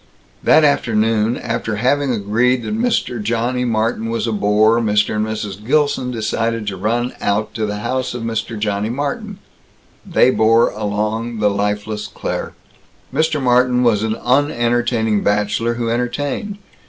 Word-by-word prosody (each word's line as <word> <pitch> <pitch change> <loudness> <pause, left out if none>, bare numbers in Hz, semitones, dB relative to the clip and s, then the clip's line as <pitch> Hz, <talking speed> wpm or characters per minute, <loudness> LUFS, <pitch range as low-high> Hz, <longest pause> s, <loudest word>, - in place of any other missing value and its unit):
That 155 - +5
afternoon, 115 -5 +2
after 115 -2 -3
having 130 +5 +1
agreed 115 +3 +1
that 215 - -3
Mr. 225 - 0
Johnny 120 +3 -1
Martin 115 -1 -1
was 115 0 -1
a 115 - -1
bore, 105 +2 +3
Mr. 105 -1 +1
and 105 +1 0
Mrs. 105 -2 -5
Gilson 145 0 +1
decided 115 -1 -2
to 100 -2 -3
run 120 +6 -1
out 105 +2 0
to 110 -2 -2
the 105 - -3
house 130 +2 -2
of 120 - -5
Mr. 115 0 -3
Johnny 105 0 -1
Martin. 145 - -3 0.7
They 130 - +3
bore 115 0 +3
along 110 +2 -2
the 105 -1 +2
lifeless 105 +1 -2
Claire. - - -4 0.6
Mr. 155 +1 +1
Martin 125 -1 +3
was 110 -4 +3
an 110 0 -1
unentertaining 120 -5 +1
bachelor 105 +3 0
who 115 -1 -2
entertained. 140 - -2
115 Hz, 145 wpm, -18 LUFS, 105-125 Hz, 0.7 s, That